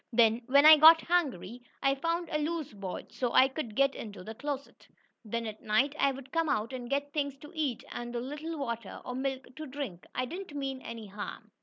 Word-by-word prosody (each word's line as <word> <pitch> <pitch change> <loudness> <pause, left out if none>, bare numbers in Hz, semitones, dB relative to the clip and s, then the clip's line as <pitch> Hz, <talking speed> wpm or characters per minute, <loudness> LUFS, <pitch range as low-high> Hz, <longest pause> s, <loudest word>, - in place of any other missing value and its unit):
Then 230 0 +4
when 280 +2 +6
I 310 0 +11
got 320 +2 +9
hungry, 250 - 0 0.2
I 275 0 +4
found 335 +5 -1
a 305 - 0
loose 310 -3 -2
board, 195 -3 -6
so 245 -2 -2
I 260 - +7
could 265 -5 -5
get 275 +2 +3
into 205 -4 -8
the 220 - -7
closet. 280 +3 -6 0.4
Then 230 +1 -3
at 215 -1 -6
night 235 +7 +2
I 275 - +4
would 270 0 -10
come 330 -1 +1
out 215 +2 0
and 245 -2 -6
get 285 +1 -1
things 280 -2 -1
to 295 +2 -12
eat 295 -8 -2
and 240 0 -5
a - - 0
little 300 +6 -5
water 235 -7 -4
or 250 - -4
milk 265 0 -4
to 310 0 -6
drink. 260 -10 -6
I 255 - 0
didn't 350 +2 -7
mean 270 -2 -3
any 230 -3 -7
harm." 205 +1 -8
270 Hz, 215 wpm, -30 LUFS, 230-295 Hz, 0.4 s, I